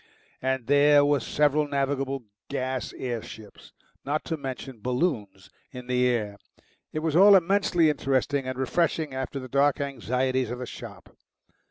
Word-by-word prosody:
And 130 -2 -1
there 145 +1 +5
were 145 -1 +3
several 150 +4 +1
navigable 135 -1 -1 0.3
gas 130 0 -3
air 120 -3 -3
ships, 110 -1 -12 0.3
not 145 +3 -2
to 165 - -2
mention 135 -3 -7
balloons, 125 - -2 0.2
in 125 -3 -9
the 125 0 +2
air. 105 -5 -1 0.5
It 155 - -4
was 160 -2 0
all 200 +3 +8
immensely 185 -2 +3
interesting 135 -1 -1
and 130 0 -4
refreshing 155 +2 0
after 130 +1 -4
the 130 - -8
dark 140 +3 +2
anxieties 130 -2 -1
of 125 - -4
the 125 - -5
shop. - - -11
135 Hz, 150 wpm, -26 LUFS, 125-145 Hz, 0.5 s, all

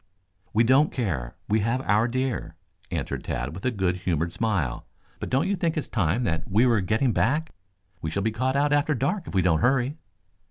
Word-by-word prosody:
"We 110 +2 +4
don't 130 +6 +4
care. 80 - -2
We 110 +2 +2
have 115 +4 0
our 110 0 +2
deer," 125 -10 -2 0.3
answered - - -3
Tad 65 +4 -3
with 95 - -8
a - - +4
good 95 -6 0
humored 85 -2 -1
smile. 90 - -1 0.3
"But - - -4
don't 130 +2 +2
you 200 - +1
think 170 -3 -1
it - - +2
is - - -9
time 105 +3 0 0.2
we 110 +6 +4
were 115 -5 +3
getting 110 +7 +1
back? 150 +11 +1 0.5
We 80 - -2
shall 100 +5 -2
be 110 - +1
caught 130 +4 -1
out 145 +1 +2
after 145 +1 +2
dark 150 - -1
if - - -7
we 95 - +3
don't 80 -3 +3
hurry." 135 +3 +2
115 Hz, 205 wpm, -26 LUFS, 90-135 Hz, 0.5 s, We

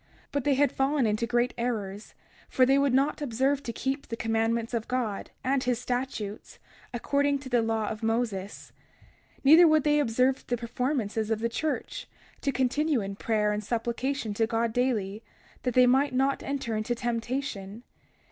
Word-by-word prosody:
31:9 - - -35 0.2
But 285 -2 -1
they 290 - +4
had 285 +1 +3
fallen 270 -1 +1
into 215 +2 0
great 240 +1 +1
errors, 210 -4 -3 0.3
for 255 - +4
they 270 +2 +4
would 280 -1 +2
not 275 +4 +1
observe 270 +1 +1
to 235 - -4
keep 270 +5 -3
the 230 - -5
commandments 225 +1 0
of 230 -1 -2
God, 240 -6 -2
and 265 +1 +1
his 245 -1 +1
statutes, 245 -4 -4 0.3
according 280 +3 +1
to 270 -1 -9
the 240 -2 +3
law 225 -1 -1
of 215 - -4
Moses. 220 -4 -2 0.6
31:10 - - -29
Neither 320 +5 +8
would 310 -2 +4
they 295 0 +3
observe 255 0 +1
the 245 - 0
performances 235 -2 -2
of 225 - +1
the 230 +2 -1
church, 315 - -3 0.3
to 280 - 0
continue 270 +3 +1
in 195 0 -5
prayer 210 0 0
and 210 0 -2
supplication 235 +2 -2
to 225 +2 +1
God 230 0 0
daily, 220 -5 0 0.4
that 250 -2 -2
they 250 0 +7
might 265 +2 +3
not 270 +1 +1
enter 270 -5 -3
into 215 +3 -1
temptation. 235 -3 -3
245 Hz, 175 wpm, -28 LUFS, 225-270 Hz, 0.6 s, Neither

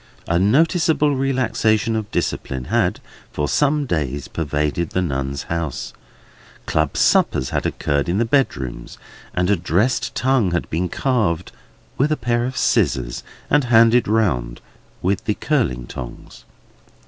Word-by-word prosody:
A 85 +1 +2
noticeable 150 - +3
relaxation 125 -4 +1
of 110 -2 -3
discipline 65 -1 -2
had - - +2 0.3
for 75 - -2
some 145 - +2
few 130 -11 -1
days 70 -1 -4
pervaded 75 +1 -2
the 95 - -1
Nuns' 70 -3 -3
House. 85 -5 -4 0.7
Club - - 0
suppers 65 0 +2
had - - 0
occurred 70 +3 -1
in 90 - +1
the 115 - +2
bedrooms, 70 - -1 0.4
and 90 +2 +1
a - - +5
dressed 95 +8 0
tongue 130 -6 +2
had 85 - -1
been 85 +3 -1
carved 105 -9 0 0.5
with 145 +4 +2
a 155 - +1
pair 120 0 0
of 130 0 -4
scissors, - - +1 0.3
and 145 -2 +3
handed 115 0 +5
round 70 - 0 0.4
with 100 +4 0
the 105 - 0
curling 70 - 0
tongs. 60 -1 -9
100 Hz, 140 wpm, -21 LUFS, -, 0.7 s, a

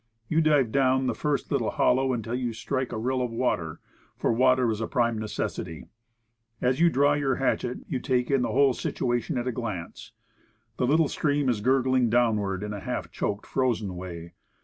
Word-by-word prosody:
You 160 +1 +2
dive 145 -7 +3
down 130 0 +2
the - - +1
first 145 -4 -2
little - - +1
hollow 130 +1 +2
until 115 -2 -3
you 125 -2 -2
strike 130 +3 -3
a - - -3
rill 130 +3 -1
of 125 - -1
water, 85 -9 -2 0.4
for - - +1
water 130 0 +3
is 110 0 -3
a 115 - -1
prime 120 -3 0
necessity. 105 -6 -4 0.7
As 125 +2 +1
you 170 0 +6
draw 145 -1 +3
28 - - +3
Woodcraft. 145 - 0
your 135 -3 +1
hatchet 125 -2 -1
you 135 - -2
take 125 0 0
in 135 -2 +3
the - - -1
whole 140 -1 +4
situation 120 +1 -2
at 120 +1 -2
a - - +1
glance. 105 -8 -6 0.6
The 125 - +1
little 155 +3 +4
stream 145 -2 0
is 115 -4 0
gurgling 130 0 +2
downward 105 -5 +1
in 105 0 -4
a 100 - -5
half 125 +2 -4
choked 105 0 -3
frozen 115 -8 -1
way. 85 -2 -8
125 Hz, 195 wpm, -26 LUFS, 110-130 Hz, 0.7 s, you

